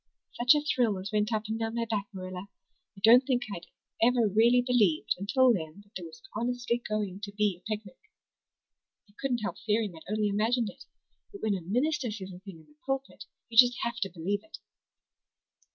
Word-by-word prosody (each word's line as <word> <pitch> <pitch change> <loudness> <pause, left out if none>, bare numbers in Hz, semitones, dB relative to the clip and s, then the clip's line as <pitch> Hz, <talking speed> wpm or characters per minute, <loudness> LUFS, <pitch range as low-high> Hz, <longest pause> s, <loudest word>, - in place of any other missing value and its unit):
"Such 245 +4 +5
a 295 - +2
thrill 240 -8 +1
as 190 +1 -6
went 210 +1 +1
up 215 -1 0
and 220 +1 -3
down 225 0 -2
my 235 0 0
back, 210 -3 -2
Marilla! 185 -1 -7 0.5
I - - -12
don't 240 +4 +8
think 255 -2 0
I'd 170 - -9 0.3
ever 235 -1 +4
really 235 +5 +4
believed 215 -11 +3
until 250 +5 +4
then 160 -1 -5
that 205 0 -25
there 175 -2 -5
was 160 0 -15
honestly 240 +1 -1
going 205 -3 -2
to 205 -1 -5
be 205 -2 +1
a - - -10
picnic. 210 -3 -5 1.1
I 205 - -25
couldn't 245 -5 -1
help - - -3
fearing 210 -4 0
I'd 160 +4 -10
only 215 0 +1
imagined 220 +2 +1
it. - - -16 0.5
But 400 - -11
when 215 - +2
a 190 - -2
minister 255 - 0
says 195 -3 -6
a 180 - -10
thing 190 -4 -11
in - - -21
the 150 0 -25
pulpit 270 0 -4 0.2
you 230 -2 +3
just 245 0 +7
have 235 0 -2
to 200 -5 -1
believe 190 +4 -2
it." 320 - -11
215 Hz, 200 wpm, -29 LUFS, 195-240 Hz, 1.1 s, don't